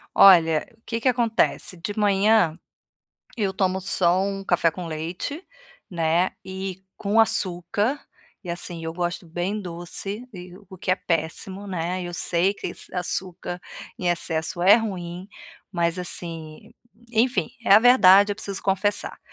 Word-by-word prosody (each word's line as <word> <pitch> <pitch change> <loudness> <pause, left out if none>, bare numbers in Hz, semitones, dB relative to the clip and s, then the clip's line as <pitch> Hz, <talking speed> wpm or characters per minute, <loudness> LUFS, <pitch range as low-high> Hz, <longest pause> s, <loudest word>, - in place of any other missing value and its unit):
Olha, 165 -5 +6
o - - -33
que 230 -1 -3
que 255 - +2
acontece? 235 -6 +1
De 195 +5 -6
manhã, 200 -4 +3 0.8
eu 200 -4 0
tomo 190 -1 0
só 185 -1 +1
um 195 0 -3
café 175 -3 +2
com 180 +1 -7
leite, 170 - -5 0.5
né, 170 +1 +1
e 190 0 -6
com 210 +2 +2
açúcar, 205 - +1 0.4
e 180 - -6
assim 170 -1 -4
eu 160 - -3
gosto 175 0 -3
bem 175 +6 -3
doce 190 +6 -6
e 180 -1 -10 0.2
o 190 - -11
que 185 - -2
é 185 - +3
péssimo, 175 +5 -3
né, 180 -1 -3
eu 175 0 -6
sei 175 +2 +1
que - - -6
esse - - -11
açúcar 180 0 -3 0.4
em 180 - -1
excesso 170 0 -1
é 195 +3 +8
ruim, 185 -4 -5 0.4
mas 170 -1 0
assim, 165 +1 -5 0.4
enfim, 225 -6 +2 0.2
é 195 - +4
a 200 - +10
verdade, 205 -4 +6
eu - - -9
preciso 200 -2 -3
confessar. 195 +1 0
185 Hz, 150 wpm, -24 LUFS, 175-200 Hz, 0.8 s, a